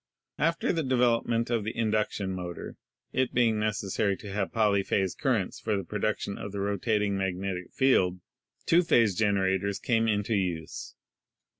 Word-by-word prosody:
After 165 +4 +1
the 165 - 0
development 120 -3 +1
of 115 -3 +1
the 110 - -5
induction 105 -3 0
motor 90 -2 -6 0.2
— - - -49
it 130 - -2
being 115 -3 +3
necessary 100 -2 0
to 100 - -9
have 100 -1 -2
polyphase 100 -4 +1
currents 115 -9 -1
for 110 -2 -1
the 100 - -3
production 105 +1 -2
of 100 - -6
the 100 - -5
rotating 100 +1 0
magnetic 95 -1 -3
field 125 -9 +3 0.2
— - - -40
two 170 +2 +5
phase 115 - +3
generators 100 -1 +1
came 115 -2 +1
into 105 +1 0
use. 90 -6 -3
105 Hz, 155 wpm, -28 LUFS, 95-115 Hz, 0.2 s, two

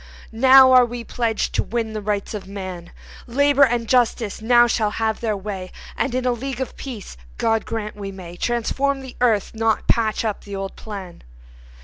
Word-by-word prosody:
Now 260 +3 +7
are 255 -1 +8
we 240 0 -4
pledged 230 -2 -1
to - - +2
win 225 -1 -3
the 215 - -4
Rights 205 0 -2
of 205 -3 -6
man; 185 -3 -7 0.4
Labor 285 +3 +2
and 240 -3 +2
Justice 235 -4 +1
now 240 +1 +5
shall 225 -2 +1
have 220 +1 -1
their 215 -3 -1
way, 195 -2 -6 0.2
And 260 -3 -1
in 255 0 -1
a 250 - +3
League 255 +1 -4
of 260 - -4
Peace 230 - -8 0.2
God 225 -1 +1
grant 215 -2 -4
we 200 -1 -6
may 180 -3 -10
Transform 265 +6 -1
the 260 -2 -10
earth, 225 -5 +2
not 225 -1 0
patch 225 -1 +1
up 215 -2 -3
the 200 -1 -7
old 195 0 -5
plan. 195 -5 -8
225 Hz, 190 wpm, -22 LUFS, 205-245 Hz, 0.4 s, are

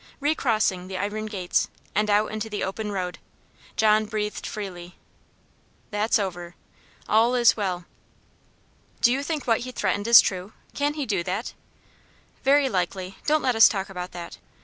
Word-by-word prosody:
Re 290 +2 +2
crossing 215 -9 0
the 190 0 -5
iron 210 +3 -3
gates, 190 -4 0 0.3
and 210 +1 +1
out 210 +1 +2
into 215 +1 -4
the 210 - -3
open 210 +2 -3
road, 180 -2 -4 0.6
John 215 0 +3
breathed 210 -1 -3
freely. 180 -4 -7 1.0
"That's 210 +3 +2
over 180 -4 -4 0.5
all 230 +3 +3
is 240 -2 +5
well." 185 -4 -3 1.2
"Do 240 - +5
you 265 +2 0
think 300 -1 -3
what 230 -2 +2
he 255 +1 -6
threatened 205 -2 -1
is 235 - +10
true? 185 +2 -1 0.2
Can 290 +1 -1
he 295 -3 -2
do 205 -6 0
it?" 185 +7 -3 0.9
"Very 280 +1 +4
likely; 185 -2 -3
don't 305 0 +3
let 250 -2 +1
us 225 - +8
talk 195 -2 -3
about 180 -1 -6
that." 175 -1 -8
210 Hz, 160 wpm, -25 LUFS, 185-235 Hz, 1.2 s, is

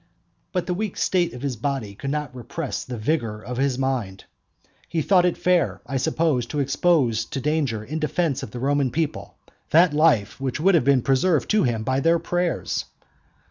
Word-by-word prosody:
But 180 -2 -1
the 180 - -1
weak 205 +1 -3
state 180 -2 +1
of 125 - -9
his 135 -4 -2
body 120 -4 -3
could 135 +7 -6
not 150 -2 -3
repress 135 +4 -5
the 125 -2 -6
vigour 115 -3 -1
of 120 +4 -6
his 135 -1 +1
mind. 125 -8 -2 0.7
He 160 -2 -1
thought 180 -3 +4
it 175 - -1
fair, 180 -5 +1
I 135 +2 -2
suppose, 155 -3 0
to 145 - -3
expose 140 -4 +2
to 135 - -5
danger 135 -6 -1
in 155 +8 -4
defence 155 -1 0
of - - -6
the 120 - -7
Roman 140 +1 +1
people 115 - -3 0.3
that 165 0 +5
life 150 -8 +2
which 130 -2 -2
had 170 -2 +4
been 135 -2 +3
preserved 140 +4 +2
to 215 0 +4
him 115 -3 -1
by 130 +3 0
their 165 +4 +3
prayers. 175 +1 -2
140 Hz, 185 wpm, -23 LUFS, 125-165 Hz, 0.7 s, that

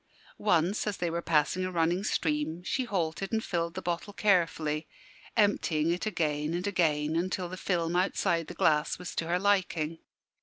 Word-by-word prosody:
Once, 185 +1 +2
as 205 - -1
they 175 -1 -1
were 170 +1 -2
passing 165 +3 +2
a 185 - -2
running 175 +2 +1
stream, 160 -3 -1
she 260 +7 -1
halted 190 -3 -2
and 220 -1 0
filled 170 -1 -2
the 185 - -5
bottle 175 +4 -3
carefully, 165 -6 +1 0.5
emptying 170 -7 +2
it 180 +5 -2
again 155 -4 -1
and 180 +2 -2
again 160 -6 +1
until 180 +1 -1
the 180 - -6
film 175 -2 -1
outside 170 -2 +1
the - - -8
glass 150 -1 +2
was 180 0 -7
to 165 - -2
her 175 +1 +2
liking. 180 -5 +1
175 Hz, 175 wpm, -29 LUFS, 160-185 Hz, 0.5 s, Once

